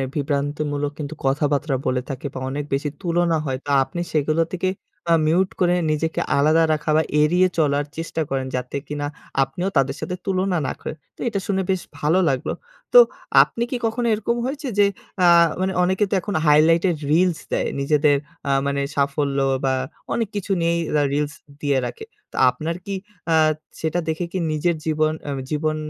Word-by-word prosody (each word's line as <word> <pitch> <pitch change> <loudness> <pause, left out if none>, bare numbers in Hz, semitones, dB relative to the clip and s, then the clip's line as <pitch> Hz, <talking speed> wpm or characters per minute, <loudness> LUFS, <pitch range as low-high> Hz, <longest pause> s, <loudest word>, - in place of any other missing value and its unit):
বিভ্রান্তিমূলক 145 0 -1
কিন্তু 145 0 -4
কথাবার্তা 145 +1 +1
বলে 125 0 +1
থাকে, 135 0 -6
বা 130 - -5
অনেক 145 +2 -3
বেশি 145 +2 0
তুলনা 170 -1 +1
হয়। 130 -1 -1
তো - - -6
আপনি 175 +6 -7
সেগুলো 155 +1 +2
থেকে 185 +1 0 0.6
মিউট 180 +4 +3
করে 180 -1 +3 0.2
নিজেকে 160 +1 -1 0.2
আলাদা 155 +3 +4
রাখা, 150 0 -3
বা 160 - +3 0.2
এড়িয়ে 175 +5 +4
চলার 145 -2 +2
চেষ্টা 165 0 -3
করেন 135 -1 -1
যাতে 125 +1 -4
কিনা 145 -1 -3 0.4
আপনিও 180 +8 -3
তাদের 135 -1 +2
সাথে 180 +3 -3
তুলনা, 190 -1 0
না - - -1
করেন। - - -6 0.2
তো - - -33
এটা 200 - -2
শুনে 190 -1 +1
বেশ 185 -2 0 0.2
ভালো 155 +6 +3
লাগলো। 130 -2 -1 0.4
তো - - +11 0.4
আপনি 235 - -4
কি 255 - 0
কখনো 230 +2 0
এরকম 220 +2 0
হয়েছে 285 +2 -4
যে, 205 - +7 0.4
আ - - +6 0.4
মানে 190 0 0
অনেকে 190 +3 +2
তো - - 0
এখন 205 - -4
হাইলাইটের 165 +4 +5 0.2
রিলস 175 0 +3
দেয়, - - 0
নিজেদের 145 +1 +3 0.3
আ - - +3 0.2
মানে 140 0 0
সাফল্য 140 0 0 0.3
বা 130 - +2 0.4
অনেক 230 -3 0
কিছু 205 -1 -3
নিয়েই 170 0 +2 0.4
রিলস 150 0 -1 0.3
দিয়ে 140 -2 +1
রাখে। 445 -1 -8 0.3
তো - - -13
আপনার 160 +6 -3
কি 200 - -4 0.4
আ - - +5 0.5
সেটা 160 +2 0
দেখে 160 +2 -1
কি 190 - -2
নিজের 160 +3 +1
জীবন, 155 0 +1 0.2
আ - - -1 0.2
জীবন 155 0 0
155 Hz, 175 wpm, -22 LUFS, 145-180 Hz, 0.6 s, তো